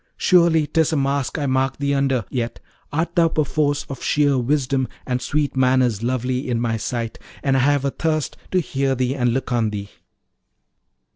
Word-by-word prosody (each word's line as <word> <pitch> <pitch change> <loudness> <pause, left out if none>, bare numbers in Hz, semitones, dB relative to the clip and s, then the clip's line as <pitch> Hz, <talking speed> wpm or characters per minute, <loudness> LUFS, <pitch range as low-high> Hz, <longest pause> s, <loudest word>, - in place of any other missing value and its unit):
Surely 170 -4 +4
'tis 160 +1 +1
a 160 - +1
mask 140 0 0
I 145 - -1
mark 130 0 0
thee 140 0 0
under; 135 -5 +1
yet 120 -2 -3 0.3
art 160 +3 -1
thou 170 -2 +5
perforce 150 -2 0
of 135 -3 -7
sheer 145 -2 +2
wisdom 130 0 0 0.2
and 125 -1 -1
sweet 145 +1 -1
manners 125 -4 +2
lovely 125 +2 -1
in 120 -2 0
my 115 -1 0
sight; 115 0 -4 0.2
and 135 -1 +2
I - - +3
have 140 +1 +2
a 140 - +1
thirst 155 -1 -1
to 185 - +2
hear 135 -3 -1
thee 130 0 0
and 125 -3 +1
look 130 +1 -2
on 115 -3 +1
thee.' 100 -1 -6
135 Hz, 185 wpm, -21 LUFS, 125-145 Hz, 0.3 s, thou